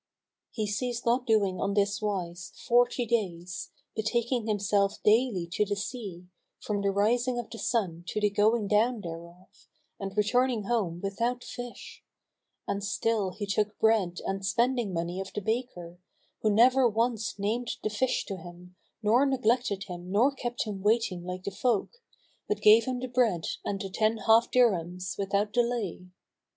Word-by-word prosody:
He 215 - -3
ceased 240 +3 -3
not 245 +2 +1
doing 200 -5 +2
on 200 0 0
this 200 0 +1
wise 185 -4 -3
forty 245 +1 +3
days, 185 -6 -2 0.3
betaking 235 +2 0
himself 200 -1 +1
daily 215 -4 +3
to 210 - +2
the 205 0 -2
sea, 200 -4 -6 0.3
from 205 -1 -2
the 200 - +1
rising 240 +5 +1
of 240 -2 -5
the 230 - -7
sun 180 -8 -1
to 215 - -2
the 210 -1 +2
going 210 +1 +2
down 220 +3 +2
thereof, 170 +1 -10 0.3
and 195 0 -6
returning 235 +2 +2
home 195 -6 -1
without 235 +5 -1
fish; 245 -1 -9 0.6
and 200 0 -2
still 205 0 0
he 205 +3 -5
took 205 +1 -1
bread 205 -6 +2
and 195 0 -2
spending 235 +2 +1
money 170 +1 -3
of 190 0 -5
the - - -2
baker, 205 -6 -3 0.4
who 215 - +1
never 245 +4 +5
once 225 -1 -1
named 225 +4 -1
the 215 - -1
fish 250 +4 0
to 195 - -5
him 175 +1 -12 0.3
nor 230 +6 +4
neglected 240 -6 +1
him 180 -1 -8
nor 235 +8 +4
kept 245 -2 -3
him 205 -3 -5
waiting 210 -4 +1
like 180 +1 -6
the 200 - -3
folk,[FN#239] 240 - -1 0.5
but 420 - -1
gave 220 +2 +7
him 255 -1 -2
the 255 - -3
bread 235 -9 +1 0.2
and 195 - -2
the 195 -2 -5
ten 220 +3 +1
half 225 +2 +4
dirhams 180 -7 +1
without 200 +1 0
delay. 235 -7 -1
210 Hz, 165 wpm, -28 LUFS, 195-235 Hz, 0.6 s, gave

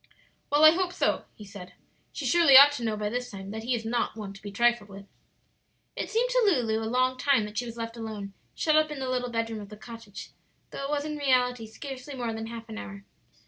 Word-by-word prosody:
"Well, 295 +1 +4
I 310 - +10
hope 360 +1 -1
so," - - 0
he 210 - -11
said. 200 -2 -11 0.4
"She - - -6
surely 335 -6 +7
ought 285 +2 +10
to 285 -4 -5
know 220 -2 -1
by 210 0 -2
this 245 +3 -3
time 195 -1 -8
that 220 +1 -5
he 245 +2 0
is 225 -1 -5
not 230 0 -1
one 205 -2 -6
to 195 - -14
be 205 - -7
trifled 235 0 +1
with." 195 0 -11 0.9
It - - -4
seemed 475 +3 +1
to - - +3
Lulu 245 - +2
a 220 - -3
long 255 +1 +1
time 270 -5 +3
that 210 0 -4
she 245 - -4
was 230 0 -8
left 230 0 -5
alone, 215 -3 -6 0.2
shut 310 -1 +1
up 310 0 +4
in 300 - -6
the 265 -1 -3
little 250 -1 -1
bedroom 230 -1 -2
of 200 - -10
the 210 - -11
cottage, 220 -2 -10 0.4
though 275 - -5
it - - -4
was 290 0 -1
in 300 -1 -4
reality 250 -4 +1
scarcely 270 +4 -8
more 240 -3 -3
than 225 0 -5
half 230 0 -8
an 220 0 -7
hour. 200 0 -9
235 Hz, 245 wpm, -27 LUFS, 215-275 Hz, 0.9 s, I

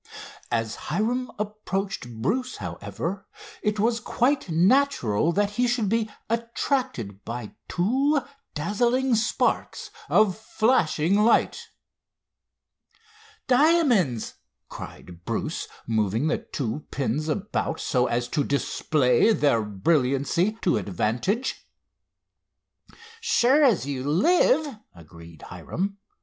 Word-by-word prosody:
As 115 -1 -1
Hiram 235 +9 0
approached 200 - -3
Bruce, 255 - -1
however, 100 - -5 0.3
it 210 0 -1
was 230 +2 +2
quite 255 +1 0
natural 170 - +2
that 205 +2 +1
he 245 +4 +1
should 235 -4 0
be 225 0 0 0.2
attracted 230 - -2
by 115 -2 -6 0.2
two 270 - +2 0.4
dazzling 240 - +1
sparks 220 -1 0 0.2
of 210 -4 +4
flashing 205 -6 +1
light. 230 - +2 1.8
"Diamonds!" 250 - +3 0.4
cried 85 -1 -10
Bruce, - - -3 0.2
moving 110 +2 0
the - - 0
two 140 +2 -5
pins 140 +3 -2
about 175 -2 -2
so 125 -2 +1
as 120 0 -1
to 150 - 0
display 140 - +2
their 145 - +2
brilliancy 140 - +1
to 175 - +3
advantage. 120 - -2 1.5
"Sure 280 - +3
as 230 - +3
you 135 -2 -3
live!" 310 - +3 0.2
agreed 85 -1 -14
Hiram. 200 +3 -4
190 Hz, 100 wpm, -25 LUFS, -, 1.8 s, of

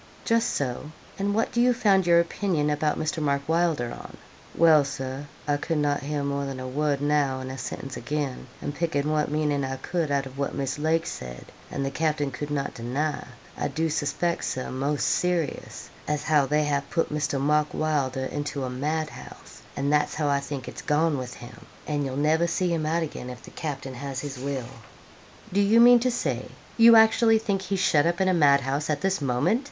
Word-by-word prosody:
'Just 230 0 +2
so; 135 +1 -3 0.3
and 200 +1 0
what 225 - +1
do 235 - +1
you 250 0 +4
found 195 -6 +3
your 170 0 +6
opinion 170 -3 0
about 150 +1 0
Mr. 160 +1 -2
Mark 140 -1 0
Wylder 160 -7 +1
on?' - - -10 0.4
'Well, 160 -3 +6
Sir, 135 +1 -5 0.2
I 145 -1 +2
could 160 +2 -2
not 145 -1 +1
hear 145 +1 -2
more 140 0 -1
than 135 -1 -5
a 130 - -5
word 145 +1 0
now 145 -2 +1
and 130 0 -6
a - - -6
sentince 130 +2 -6
again; 145 +1 -3 0.2
and 145 - -3
pickin' 150 -2 -1
what 150 -1 +1
meaning 150 -1 0
I 135 0 -2
could 160 +4 -2
out 140 -1 +1
of 135 +1 -10
what 140 - -2
Miss 135 0 -2
Lake 160 +2 +1
said, 60 - -7 0.2
and 140 - -3
the 135 - -2
capting 150 -1 0
could 145 +3 -5
not 145 -1 -2
deny, 135 +6 -2 0.3
I - - -1
do 160 +1 -1
suspeck, 155 +4 -1
Sir, 130 - -3
most 140 +3 -1
serious, 175 -5 -1 0.2
as 150 -1 -1
how 145 -3 +3
they 150 +1 +2
have 145 -1 -1
put 165 -3 -1
Mr. 145 -2 -1
Mark 150 +2 +2
Wylder 140 -4 -1
into 145 0 -3
a 130 - -3
mad 155 +4 -2
house; - - -12 0.2
and 140 +1 0
that's 150 0 +2
how 150 -1 0
I 140 0 +2
think 140 -2 -6
it's - - -7
gone 155 +1 +2
with 125 -1 -6
him; 120 - -12 0.2
an' 145 -1 -1
you'll 135 0 -4
never 160 +3 +2
see 175 0 0
him 155 -2 -1
out 165 +2 +1
again 135 -5 -6
if 125 - -9
the - - -12
capting 135 -4 -5
has 135 +1 -5
his 140 -3 -6
will.' 135 -2 -3 0.9
'Do 200 - +3
you 210 +3 +5
mean 240 +1 +8
to 250 +2 +1
say 135 - -2 0.3
you 230 0 +8
actually 225 0 +6
think 205 -3 -1
he's 190 0 -2
shut 155 -4 +3
up 170 0 0
in 190 - +2
a 185 - +3
madhouse 140 -2 +3
at 150 -2 0
this 190 -2 0
moment?' 140 - +1
150 Hz, 210 wpm, -26 LUFS, 140-165 Hz, 0.9 s, mean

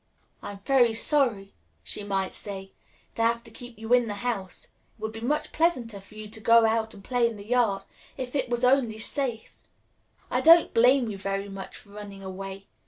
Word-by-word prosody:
"I - - -6
am 200 - -12
very 240 -1 +3
sorry," 230 -7 +1 0.3
she 210 - -5
might 195 -2 -1
say, 195 -2 -6 0.4
"to - - -3
have 235 +1 +2
to 230 - -13
keep 245 0 -10
you 225 +2 -1
in 245 -2 +4
the 205 - -3
house. 195 -6 -3
It - - -21 0.3
would 220 0 -4
be 225 - -8
much 290 +6 -1
pleasanter 250 -11 0
for 200 +2 -17
you 215 0 -7
to 220 +1 -8
go 230 +1 +6
out 220 0 0
and 200 - -13
play 245 0 +2
in 230 - -8
the 200 -1 -10
yard, 220 -5 +2 0.3
if 255 -2 -5
it 275 - 0
was 240 0 -1
only 250 -4 +3
safe. 240 0 -3 0.8
I - - +1
don't 330 +1 +7
blame 245 0 +4
you 195 - -7
very 195 +1 -3
much 195 -1 -8
for - - -17
running 200 -1 -9
away. 195 +1 -7
225 Hz, 205 wpm, -27 LUFS, 200-245 Hz, 0.8 s, don't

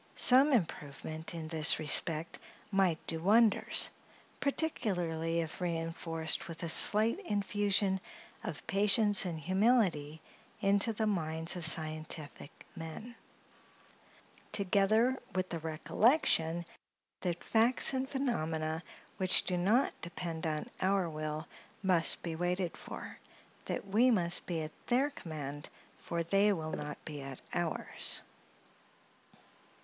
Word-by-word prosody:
Some 265 +4 +6
improvement 160 - -3
in 160 -1 -6
this 160 -1 +3
respect 155 +1 +1 0.3
might 190 -5 +2
do 165 - -2
wonders, 215 +4 +5 0.5
particularly 175 - -2
if 160 +2 -7
reinforced 165 0 -3
with 165 0 -9
a 165 - -3
slight 215 - +9
infusion 205 - -1 0.4
of - - -7
patience 205 -1 +3
and 165 -3 -4
humility 185 - 0 0.4
into 200 +3 +2
the 220 0 -2
minds 165 -4 -2
of 170 -3 +3
scientific 155 -2 -1 0.3
men; 165 +9 -9 1.4
together 215 +6 +1 0.2
with 185 0 -2
the 170 - -4
recollection 165 - 0 0.5
that 175 -2 -4
facts 235 +4 +3
and 265 0 -3
phenomena, 160 - -3 0.4
which 185 -2 +3
do 180 - -1
not 205 +9 +1
depend 170 -1 -5
on 155 -1 -4
our 190 -1 +1
will, 155 0 -5 0.4
must 180 -4 +1
be 165 -2 -4
waited 175 +1 -2
for—that - - -10
we 220 +6 +2
must 175 -7 +1
be 165 -3 -3
at 155 - -7 0.2
their 265 +4 +1
command, 145 - -8 0.3
for 170 0 -4
they 195 +5 +2
will 160 -5 -4
not 150 -1 -6
be 150 -2 -7
at 135 -1 -9
ours. 175 -2 +1
175 Hz, 115 wpm, -31 LUFS, 160-205 Hz, 1.4 s, slight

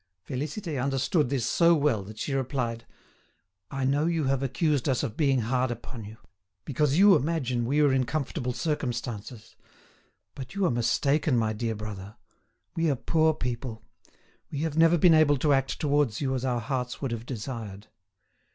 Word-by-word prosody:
Félicité 150 +2 -3
understood 140 +2 +1
this 130 -4 -1
so 170 +6 +4
well 140 -8 +1
that 105 +3 -11
she 140 - -3
replied: 125 -3 -2 0.8
"I 135 -1 -2
know 145 +4 +2
you 165 -2 0
have 135 -1 +1
accused 145 0 0
us 130 0 +1
of 115 -6 -3
being 135 -4 +2
hard 125 +3 0
upon 120 -1 -7
you, 110 +2 -10 0.5
because 145 +1 +1
you 200 0 +7
imagine 135 -6 0
we 145 +5 +2
are 145 -3 +4
in 130 -2 +1
comfortable 140 -3 -2
circumstances; 120 -5 -4 0.8
but 135 +6 -9
you 200 -1 +1
are - - +2
mistaken, 140 +4 +1
my 110 -1 +1
dear 115 +1 -2
brother; 105 -1 -7 0.6
we 165 -1 +1
are 140 - +2
poor 160 +4 +2
people; 120 -3 -4 0.7
we 145 - -4
have 160 -2 -2
never 165 +1 +5
been 170 +1 +6
able 155 -2 +5
to 145 +2 +2
act 135 0 0
towards 145 -7 +1
you 135 -2 -1
as 130 -1 -2
our 125 -2 0
hearts 125 +1 -3
would 135 -4 -3
have 115 +1 -5
desired." 110 -5 -6
135 Hz, 170 wpm, -27 LUFS, 120-150 Hz, 0.8 s, you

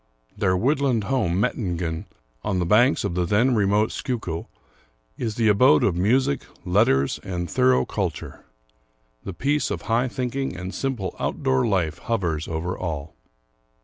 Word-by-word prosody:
Their 95 -3 +1
woodland 130 0 +1
home, 100 -7 0
Mettingen, 90 -8 -2 0.4
on 100 - -1
the 90 - 0
banks 120 +9 +4
of 100 -4 -2
the 90 0 0
then 110 +9 +2
re 105 -4 +2
mote 105 +2 +2
Schuylkill, 110 - -4 0.7
is 110 -3 -3
the 115 -1 +2
abode 105 -7 +5
of 90 - +2
music, 130 +9 +2 0.2
letters 90 -8 +2
and 90 -2 -4
thorough 130 +3 +3
cul 95 -4 -1
ture. 80 - -11 0.8
The 95 - -5
peace 145 - 0
of - - -4
high 120 +3 +1
thinking 130 -2 -3
and 90 +2 -6
simple 125 -9 -3
outdoor 65 +7 0
life 90 -7 0
hovers 85 -9 -2
over 85 +2 -3
all. 80 -3 -5
100 Hz, 150 wpm, -24 LUFS, 85-125 Hz, 0.8 s, abode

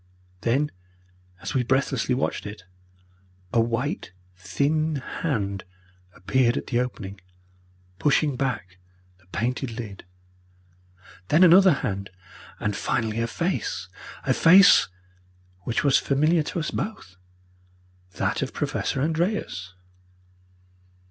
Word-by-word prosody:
Then, 140 +6 +1 0.7
as 95 - -4
we 130 - +2
breathlessly 130 0 +1
watched 130 - -2
it, 100 -2 -9 0.9
a 115 - +4
white 120 - -2 0.2
thin 155 - 0
hand 110 - -3 0.5
appeared 120 +7 +1
at - - -3
the 120 - 0
opening, 100 -6 -4 0.8
pushing 150 -1 +2
back 120 -9 -3 0.4
the 90 - -28
painted 120 +3 -3
lid, 105 -4 -7 1.2
then 160 - +5
another 185 +2 +8
hand, 100 0 -3 0.5
and 105 -1 -1
finally 110 +1 -1
a 115 - 0
face 115 - -2 0.3
a 130 - +2
face 185 +8 +7 0.8
which 115 - 0
was 140 -2 +4
familiar 155 +4 +2
to 155 - -3
us 150 - -3
both, 95 - -5 1.0
that - - -1
of - - -3
Professor 135 - -1
Andreas. 160 - -2
125 Hz, 110 wpm, -25 LUFS, 105-150 Hz, 1.2 s, another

